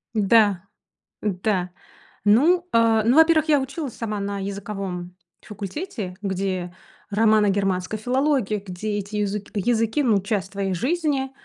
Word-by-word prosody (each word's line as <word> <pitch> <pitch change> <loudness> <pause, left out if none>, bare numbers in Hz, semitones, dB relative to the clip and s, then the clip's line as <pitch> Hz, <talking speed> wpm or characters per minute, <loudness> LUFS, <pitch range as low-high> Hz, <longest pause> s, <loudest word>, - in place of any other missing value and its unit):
Да. 205 -3 +4 0.6
Да 185 -2 -1 0.5
ну, 335 - +4
э, 225 -1 +4
ну, 245 - +4
во-первых, 320 -1 +5
я 295 -2 +5
училась 270 -1 -5
сама 215 -3 -4
на 200 0 -3
языковом 195 -3 -5 0.3
факультете, 210 - -6
где 185 -2 -2 0.4
романо-германской 205 -2 +2
филологии 250 -4 0
где 205 +3 -3
эти 205 +1 -5
юзык 205 0 -2
языки, 225 +6 +1
ну 215 -6 +3
часть 195 -1 -3
твоей 195 -2 -2
жизни. 275 - -1
210 Hz, 120 wpm, -23 LUFS, 195-245 Hz, 0.6 s, во-первых